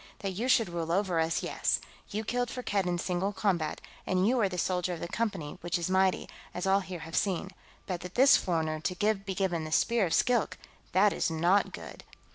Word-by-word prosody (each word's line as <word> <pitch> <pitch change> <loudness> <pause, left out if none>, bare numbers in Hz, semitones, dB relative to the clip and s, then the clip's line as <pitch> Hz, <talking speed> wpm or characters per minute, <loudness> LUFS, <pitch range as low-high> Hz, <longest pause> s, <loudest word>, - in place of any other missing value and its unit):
"That 195 - -2
you 215 +7 -2
should 230 -4 +4
rule 165 -1 -3
over 185 -2 +1
us, 160 +1 0
yes. - - 0 0.3
You 215 +2 -3
killed 245 +2 -1
Firkked 205 -7 -1
in 175 0 0
single 180 +3 -1
combat, 190 -5 -1 0.3
and 185 +1 +2
you 250 +2 +2
are 200 - +2
the 180 - -5
soldier 180 0 0
of - - -9
the 170 - -4
Company, 190 -8 -3
which 175 +1 -1
is 175 +1 -2
mighty, 190 0 +2 0.3
as 180 - -3
all 195 +1 +4
here 185 -3 -7
have 165 +1 -7
seen. 190 -1 0 0.3
But 180 -2 -4
that 180 0 -8
this 270 +3 +7
foreigner 160 -3 0
be 195 +1 -1
given 180 -4 0
the 155 - -6
Spear 225 +5 +2
of 165 - +1
Skilk, 245 -3 +2 0.4
that 200 +3 +5
is - - 0
not 170 +5 +2
good!" - - -9
185 Hz, 210 wpm, -30 LUFS, 170-205 Hz, 0.4 s, this